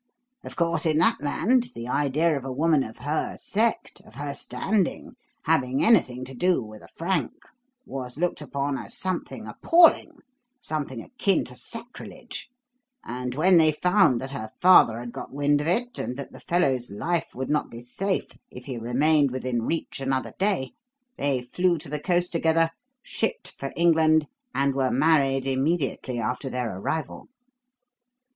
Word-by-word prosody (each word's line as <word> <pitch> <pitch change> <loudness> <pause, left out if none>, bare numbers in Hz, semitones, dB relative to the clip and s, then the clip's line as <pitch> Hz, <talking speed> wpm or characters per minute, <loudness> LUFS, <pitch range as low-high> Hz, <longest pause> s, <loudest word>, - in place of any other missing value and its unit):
Of - - -9
course, 170 -1 +1
in 155 -1 +3
that 160 - +4
land, 230 - +1
the 115 +1 -6
idea 150 +5 +1
of 140 - -4
a 135 - -5
woman 155 +2 +2
of 110 -4 -6
her 150 +2 -2
sect, 225 +3 0
of - - -18
her 145 0 -4
standing, 185 - -1 0.3
having 135 -5 +1
anything 130 - +3
to 130 - -7
do 180 +8 +2
with 110 -1 -11
a - - -14
Frank 165 -6 -2 0.5
was 125 - -6
looked 175 -1 -1
upon 140 -1 -2
as - - -1
something 185 -1 -3
appalling, 340 -1 +4 0.5
something 145 - -4
akin 200 -7 0
to 125 - -8
sacrilege; 235 - -8 0.5
and 125 +1 -5
when 175 +5 +5
they 160 -1 +6
found 180 - +3
that 135 +1 -6
her 110 -6 -5
father 175 -11 +6
had 120 0 -7
got - - -8
wind 145 +1 +1
of 150 - -3
it 240 +8 0
and 125 - -4
that 140 - -7
the - - -12
fellow's 135 -9 0
life 165 - -2
would 130 +2 -3
not 150 - 0
be 115 - -9
safe 190 +11 -2 0.2
if 125 0 -11
he 130 -4 -5
remained 140 +5 +2
within 125 -2 -2
reach 160 +6 -3
another 135 -1 -2
day, 190 -10 0 0.5
they 135 -3 0
flew 175 +7 +1
to 145 - -7
the 150 +1 -2
coast 175 +2 0
together, 165 -1 +2 0.3
shipped 225 - -3
for 135 - -6
England, 160 -2 +4 0.3
and 140 0 +2
were 130 -1 +1
married 135 -4 +2
immediately 135 -2 -1
after 125 +4 -2
their 125 -6 -3
arrival." 155 +8 -4
145 Hz, 165 wpm, -25 LUFS, 130-170 Hz, 0.5 s, they